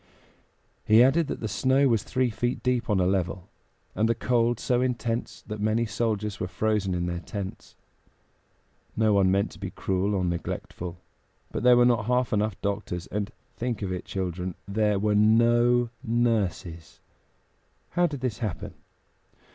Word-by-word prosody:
He 110 +3 +6
added 145 +5 +3
that - - -5
the 110 - -2
snow 130 +5 +2
was 115 -4 +2
three 125 +2 0
feet 120 +3 -2
deep 125 -2 0
on 105 -3 +2
a 90 - +3
level, 90 -1 -1 0.5
and 110 +1 +1
the 115 - +2
cold 120 0 +1
so 125 -1 +1
intense 120 -2 -2
that 105 -1 -6
many 110 +2 +1
soldiers 105 -3 -2
were 90 - -2
frozen 105 -1 0
in 85 0 -1
their 85 0 -2
tents. 95 +3 -7 1.2
No 110 -1 +3
one 100 -2 +4
meant 100 +3 +1
to - - -14
be 95 -2 -4
cruel 95 +2 -1
or 95 -2 0
neglectful; 85 0 -4 0.5
but - - -3
there 125 0 +6
were 120 - +6
not 120 -3 +2
half 125 -1 +1
enough 105 -1 0
doctors, 100 -3 -3
and 100 +1 -2 0.2
think 120 -3 -3
of 95 - -2
it, 90 - -5
children! 90 -1 -3
there 105 0 +1
were 105 +1 +1
no 120 +3 +4
nurses. 100 -8 -1 0.9
How 175 0 +3
did 145 -5 -6
this 125 -5 -2
happen? 100 -8 -4
110 Hz, 165 wpm, -26 LUFS, 95-120 Hz, 1.2 s, He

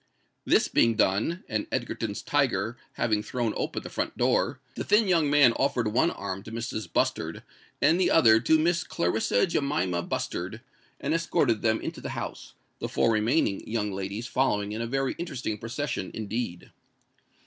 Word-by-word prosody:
This - - +4
being 115 -1 +3
done, 110 - +1
and 110 -3 -2
Egerton's - - -3
tiger - - +1 0.2
having 110 -3 +1
thrown 115 0 -2
open - - -3
the - - -7
front - - -3
door, - - +1
the - - -4
thin 210 +1 +3
young 165 -5 +3
man 145 -5 +6
offered 130 -5 0
one 125 +10 +3
arm 95 - -5
to 110 - -10
Mrs. 110 -5 -4
Bustard 80 0 -1 0.4
and 160 +5 +5
the 180 - +3
other 115 -8 +6
to 140 +8 +4
Miss 170 +1 +1
Clarissa 100 - +1
Jemima 140 - 0
Bustard, 90 +5 -4 0.4
and 145 - -1
escorted 165 -9 +1
them 110 0 +2
into - - -5
the - - -5
house, - - -6 0.2
the - - -3
four 115 - +2
remaining 110 0 +2
young 105 -2 -1
ladies 100 +4 -4
following 105 -6 0
in 110 +2 -3
a 115 - -2
very 135 +2 0
interesting 130 -10 -4
procession 115 -4 -3
indeed. 110 -4 -4
115 Hz, 165 wpm, -27 LUFS, 105-145 Hz, 0.4 s, man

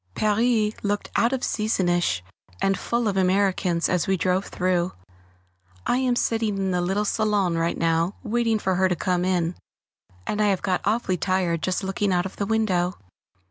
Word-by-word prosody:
Paris 215 0 +2
looked 205 0 -2
out 235 - +3
of 265 -2 -1
seasonish 175 - 0 0.4
and 195 - +2
full 235 +4 -1
of 200 - 0
Americans 185 -2 +2
as 180 -3 0
we 190 0 +2
drove 185 +3 +1
through. 180 -1 0 0.9
I - - +2
am 255 -1 +1
sitting 225 -4 0
in 190 -1 -1
the 180 -1 0
little 195 +4 0
salon 205 -4 +1 0.2
now, 165 +3 +1
waiting 230 -1 +1
for 190 -2 0
her 190 0 +3
to 180 - +1
come 180 +2 0
in, 180 -2 0 0.7
and 210 - -1
I 210 - +3
have 195 -3 0
got 185 -2 0
awfully 205 -3 +1
tired 180 -3 0
just 185 +3 -1
looking 195 +1 -1
out 180 0 +1
of 190 - -7
the 200 - -2
window. 190 -5 +1
190 Hz, 175 wpm, -24 LUFS, 180-215 Hz, 0.9 s, out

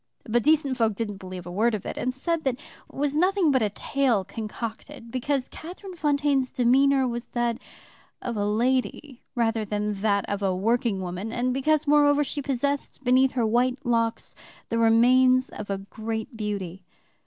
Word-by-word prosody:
But 240 +2 +2
decent 290 -2 +2
folk 225 -3 +1
didn't 210 -2 -4
believe 185 -2 -8
a 175 - -7
word 220 +5 +2
of 205 - -7
it, - - -4
and 255 - -1
said 330 +6 -2
it 250 -2 0 0.3
was 285 0 -1
nothing 365 0 +3
but 260 -2 +2
a 215 - +2
tale 240 0 0
concocted 230 +4 -7
because 260 +1 -1
Catherine 370 +4 -9
Fontaine's 285 -4 +1
demeanor 265 +2 +3
was 240 0 -4
that 240 0 0 0.6
of 240 -2 -4
a 205 - -1
lady 250 +5 -1
rather 225 -2 +1
than 210 0 -2
that 200 -2 +1
of 205 0 -3
a 190 -2 +1
working 225 0 0
woman, 185 +4 -5
and 250 +1 0
because, 305 +3 +1
moreover, 290 0 +4
she 285 +1 -4
possessed 280 +1 -2
beneath 260 +1 +4
her 240 -3 +1
white 245 +3 +2
locks 230 -1 0 0.4
the 230 - 0
remains 255 +3 +4
of 210 - -8 0.2
great 220 +2 -4
beauty. 200 -4 -4
240 Hz, 165 wpm, -25 LUFS, 220-275 Hz, 0.6 s, moreover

